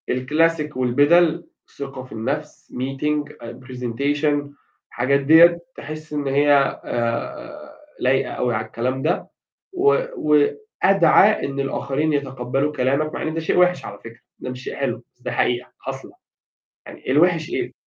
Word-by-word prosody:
الclassic 150 +3 0
والبِدَل، 155 +7 +3 0.3
ثقة 135 -2 -6
في 130 - -16
النَفس، 140 +7 -5
meeting 145 +3 -2
أ 115 - -9
presentation، 140 +4 -1 0.4
الحاجات 135 +3 +1
ديّة 165 +4 +6 0.2
تحس 155 +1 -8
إن 145 -2 -2
هي 140 0 +3
آآ، 115 -1 -4 0.3
لايقة - - +1
أوي 125 -1 -1
على 110 0 -2
الكلام 125 +4 -3
ده، - - -1 0.5
و 390 +3 +3 0.2
وأدعَى 195 - +3
إن 140 0 -4
الآخرين 140 +2 -1
يتقبّلوا 135 0 -1
كلامك، 140 +4 0
مع - - -4
إن 160 - -2
ده 165 - -2
شيء 160 - -1
وحِش 180 0 +3
على 100 - -8
فكرة 115 +1 -13 0.2
ده - - -6
مش 125 0 -7
شيء - - -6
حلو، - - -3
بس - - -36
ده - - -4
حقيقة 125 0 -1
حاصلة، - - -7 0.7
يعني - - -7
الوحِش 165 +2 +3
إيه؟ 370 - -3
145 Hz, 145 wpm, -21 LUFS, 130-155 Hz, 0.7 s, ديّة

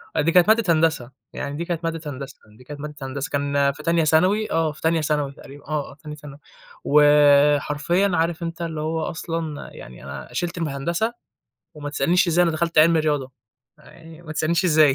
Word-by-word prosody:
آه - - +2
دي 165 +3 +1
كانت 180 +1 +5
مادة 220 -5 +4
هندسة، 155 -6 0 0.2
يعني 145 0 -5
دي 170 - -3
كانت 170 -1 -3
مادة 165 -1 -3
هندسة، 135 +1 -9 0.2
دي 125 - -16
كانت 145 +3 -9
مادة 150 0 -7
هندسة، 135 +1 -4
كان 140 0 +1
في 150 +2 -12
تانية 165 0 +2
ثانوي، 185 +8 +2
آه، 160 -1 +1
في 150 - -15
تانية 160 0 +1
ثانوي 150 -2 -1
تقريبًا 140 +1 -14
آه، 150 -2 -3
آه - - -14
تانية 150 -1 -7
ثانوي، 145 -1 -12 0.5
وحرفيًا 150 +4 +4
عارف 170 0 0
أنت 165 0 -5
اللي 160 -2 -4
هو 160 +1 -2
أصلًا 165 -3 -4
يعني - - -12
أنا 70 0 -8
شِلت 175 0 -3
الم 165 -3 -2
هندسة 170 +11 -2 0.6
وما 145 -1 -6
تسألنيش 175 +5 +2
إزاي 170 +1 +3
أنا 170 - +2
دخلت 165 +1 -1
علمي 165 +1 +5
رياضة، 145 -4 -1 0.5
يعني 165 0 -15
وما 155 -2 -8
تسألنيش 170 +4 0
إزاي 155 -5 +5
155 Hz, 195 wpm, -22 LUFS, 145-170 Hz, 0.6 s, كانت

